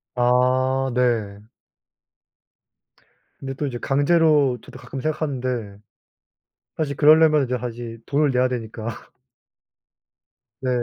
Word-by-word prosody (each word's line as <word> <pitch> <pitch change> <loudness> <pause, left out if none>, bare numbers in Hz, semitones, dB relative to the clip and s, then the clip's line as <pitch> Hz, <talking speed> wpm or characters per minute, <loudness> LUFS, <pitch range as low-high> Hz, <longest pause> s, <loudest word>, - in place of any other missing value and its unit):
아 130 +2 +2
네. 115 -5 0 2.0
근데 135 0 -5
또 140 +3 -4
이제 130 -4 -4
강제로 145 -2 +3
저도 - - -13
가끔 135 - -8
생각하는데 130 -9 -3 1.0
사실 145 -3 -2
그러려면 155 -1 +5
이제 125 0 -2
다시 120 -1 -6
돈을 145 0 +1
내야 125 0 +2
되니까. 115 -2 -5 1.7
네. 130 - -2
130 Hz, 205 characters per minute, -22 LUFS, 120-145 Hz, 2.0 s, 그러려면